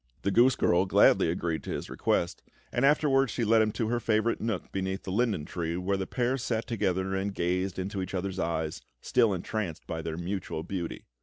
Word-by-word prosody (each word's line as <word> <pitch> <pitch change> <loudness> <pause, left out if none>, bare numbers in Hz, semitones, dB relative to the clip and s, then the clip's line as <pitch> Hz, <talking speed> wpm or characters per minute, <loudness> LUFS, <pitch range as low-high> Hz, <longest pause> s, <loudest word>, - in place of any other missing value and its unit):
The 100 - +1
goose 120 +4 +5
girl 90 +2 +2
gladly 85 - +5
agreed 85 -1 -1
to - - -6
his - - -3
request; - - -1 0.3
and 120 - 0
afterwards 135 -2 +4
she 120 - -1
led 110 +1 +5
him 110 0 +2
to 110 -2 -1
her 120 0 +1
favourite 110 0 +1
nook 110 -5 -3
beneath 95 0 -3
the 95 - -5
linden 105 -7 +1
tree, 85 0 -3
where 95 +2 0
the 95 -1 -3
pair 125 +1 0
sat 115 -1 -1
together 95 -5 -1
and 95 +1 -2
gazed 90 +2 -1
into 95 +1 -3
each 95 - -4
other's 95 0 -3
eyes, 80 -2 -2 0.2
still 115 - +3
entranced 95 -2 -3
by 80 - -4
their 80 0 -4
mutual 85 -2 -3
beauty. 90 -3 -5
95 Hz, 205 wpm, -29 LUFS, 90-115 Hz, 0.3 s, goose